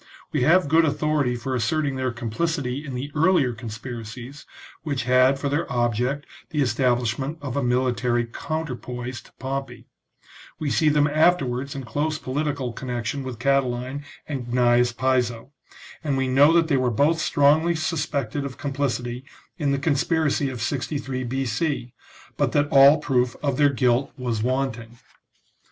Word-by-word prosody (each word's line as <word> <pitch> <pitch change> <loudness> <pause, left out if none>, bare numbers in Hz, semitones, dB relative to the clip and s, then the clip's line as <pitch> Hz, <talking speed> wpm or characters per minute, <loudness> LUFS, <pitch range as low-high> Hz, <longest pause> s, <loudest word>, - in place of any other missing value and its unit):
We - - 0
have 170 +5 +4
good 160 +3 +4
authority 150 -4 +1
for 130 +2 -4
asserting 135 +4 0
their 130 -1 -1
complicity 125 +4 -2
in 135 -4 -6
the 135 +4 -4
earlier 155 -5 +3
conspiracies, 120 +3 -8 0.3
which 140 -5 -2
had 130 +2 +4
for 140 - -3
their 145 +3 -1
object 125 +4 0 0.2
the 150 - -3
establishment 125 +3 0
of 140 -4 -5
a 140 - +1
military 125 -1 +1
counterpoise 125 -2 -5
to - - -20
Pompey; 135 +1 -5 0.7
we 150 -3 -2
see 155 +2 +3
them 150 -1 +3
after 155 +2 +3
wards 130 +3 -4
in 135 - -5
close 150 +6 -1
political 140 -2 -2
connection 125 +3 -3
with 130 -3 -6
Catiline 130 +1 0 0.2
and 135 -5 -4
Gnaeus 120 0 +3
Piso; 125 -1 0 0.5
and 140 -3 0
we 135 0 0
know 140 +4 +5
that 165 -1 +4
they 145 -4 +2
were 130 -1 +1
both 145 +8 +2
strongly 155 +5 +3
suspected 145 -5 -2
of 135 -3 -6
complicity 130 -3 -2 0.4
in 145 -3 +1
the 140 - +1
conspiracy 145 0 +1
of 120 -4 -5
63 130 +1 -3
B.C., 130 +1 -2 0.4
but - - +1
that 145 0 +2
all 140 +2 +8
proof 125 -5 0
of 140 -3 0
their 145 -1 +5
guilt 125 -1 +1
was 120 -4 -2
wanting. 120 -2 -2
135 Hz, 150 wpm, -24 LUFS, 125-145 Hz, 0.7 s, all